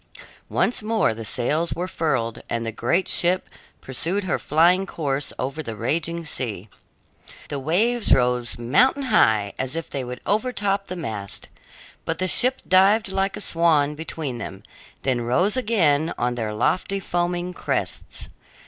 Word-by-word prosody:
Once 245 Hz, -, +1 dB
more 215 Hz, -, +1 dB
the 115 Hz, +1 st, -7 dB
sails 145 Hz, +9 st, 0 dB
were 180 Hz, +1 st, -3 dB
furled, 135 Hz, -10 st, -1 dB
and 115 Hz, 0 st, -2 dB
the 115 Hz, -, -2 dB
great 130 Hz, -, 0 dB
ship 180 Hz, +2 st, +2 dB, 0.3 s
pursued 170 Hz, +10 st, -2 dB
her 185 Hz, -, -1 dB
flying 175 Hz, +5 st, +3 dB
course 140 Hz, -5 st, -2 dB
over 135 Hz, +5 st, -3 dB
the 115 Hz, -7 st, -6 dB
raging 165 Hz, +9 st, -1 dB
sea. 110 Hz, -9 st, -4 dB, 0.8 s
The 145 Hz, -, -3 dB
waves 210 Hz, -, +1 dB
rose 125 Hz, -2 st, +2 dB
mountain 245 Hz, -, +3 dB
high, 105 Hz, -2 st, +4 dB
as 130 Hz, +3 st, -3 dB
if 165 Hz, -1 st, -4 dB
they 135 Hz, -, -3 dB
would 125 Hz, 0 st, -6 dB
overtop 205 Hz, -2 st, 0 dB
the 185 Hz, -, -5 dB
mast, 110 Hz, -, -5 dB, 0.5 s
but 165 Hz, -, -2 dB
the 185 Hz, -, 0 dB
ship 255 Hz, +7 st, +3 dB
dived 195 Hz, +3 st, +5 dB
like 195 Hz, 0 st, 0 dB
a -, -, -5 dB
swan 160 Hz, -5 st, +3 dB
between 150 Hz, -5 st, -4 dB
them, 95 Hz, -3 st, -7 dB, 0.4 s
then 130 Hz, -3 st, +1 dB
rose 175 Hz, -, +2 dB
again 170 Hz, -, +2 dB
on 120 Hz, 0 st, 0 dB
their 115 Hz, -3 st, -3 dB
lofty, 185 Hz, -, 0 dB
foaming 175 Hz, 0 st, -2 dB
crests. -, -, -3 dB
160 Hz, 150 wpm, -23 LUFS, 125-185 Hz, 0.8 s, dived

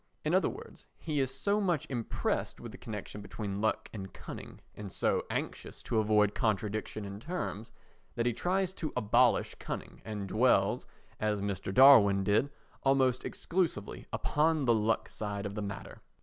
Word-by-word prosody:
In -, -, +1 dB
other -, -, +4 dB
words, -, -, -11 dB
he 155 Hz, -3 st, -2 dB
is 130 Hz, -1 st, +1 dB
so 200 Hz, +10 st, 0 dB
much 175 Hz, -7 st, +1 dB
impressed 120 Hz, -4 st, -2 dB
with -, -, -8 dB
the -, -, -10 dB
connection 105 Hz, -1 st, -6 dB
between 100 Hz, -1 st, -5 dB
luck 110 Hz, -, 0 dB
and 95 Hz, -3 st, -6 dB
cunning, -, -, -9 dB
and 105 Hz, -2 st, -8 dB
so -, -, +1 dB
anxious -, -, -4 dB
to 110 Hz, -, +1 dB
avoid 105 Hz, -1 st, +3 dB
contradiction 110 Hz, -2 st, -1 dB
in 100 Hz, 0 st, -7 dB
terms, 120 Hz, -, -4 dB, 0.4 s
that 115 Hz, -, 0 dB
he 120 Hz, -, +2 dB
tries 185 Hz, -, 0 dB
to 160 Hz, -5 st, -4 dB
abolish 120 Hz, +2 st, +3 dB
cunning, -, -, -6 dB
and 105 Hz, -2 st, -5 dB
dwells, -, -, +3 dB, 0.3 s
as 105 Hz, -1 st, 0 dB
Mr. 100 Hz, -1 st, -3 dB
Darwin 100 Hz, -6 st, +7 dB
did, 105 Hz, +8 st, +2 dB, 0.3 s
almost 135 Hz, -2 st, +3 dB
exclusively 165 Hz, -, -2 dB
upon 155 Hz, -1 st, +1 dB
the 120 Hz, -, +5 dB
luck 110 Hz, 0 st, +1 dB
side 105 Hz, -1 st, -4 dB
of 100 Hz, -, -4 dB
the 105 Hz, -, -4 dB
matter. 100 Hz, 0 st, -7 dB
110 Hz, 165 wpm, -31 LUFS, 105-135 Hz, 0.4 s, Darwin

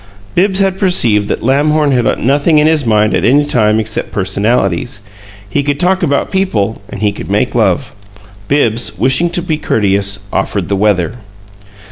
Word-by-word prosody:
Bibbs 190 Hz, +2 st, +2 dB
had 195 Hz, -1 st, 0 dB
perceived 115 Hz, -, +2 dB
that -, -, -3 dB
Lamhorn 145 Hz, +3 st, +2 dB
had 125 Hz, -3 st, +1 dB
nothing 145 Hz, +5 st, +1 dB
in 150 Hz, -, +4 dB
his 155 Hz, -5 st, +1 dB
mind 105 Hz, -1 st, +2 dB
at -, -, 0 dB
any 145 Hz, +4 st, +3 dB
time 110 Hz, -6 st, +2 dB
except 110 Hz, -1 st, -3 dB
"personalities" 100 Hz, 0 st, -1 dB, 0.5 s
he 140 Hz, +8 st, -1 dB
could 140 Hz, 0 st, -2 dB
talk 185 Hz, +2 st, +1 dB
about 140 Hz, -5 st, 0 dB
people 110 Hz, -, -1 dB
and 100 Hz, -, -7 dB
he 105 Hz, -, +2 dB
could 100 Hz, -, -9 dB
make 105 Hz, +5 st, 0 dB
love. 100 Hz, -7 st, 0 dB, 0.5 s
Bibbs, 120 Hz, -5 st, 0 dB
wishing 130 Hz, +7 st, +2 dB
to 175 Hz, 0 st, -1 dB
be 160 Hz, -4 st, -2 dB
courteous, 100 Hz, -4 st, 0 dB
offered 100 Hz, -4 st, -2 dB
the 100 Hz, -, +1 dB
weather. 100 Hz, +1 st, 0 dB
120 Hz, 165 wpm, -13 LUFS, 105-150 Hz, 0.5 s, in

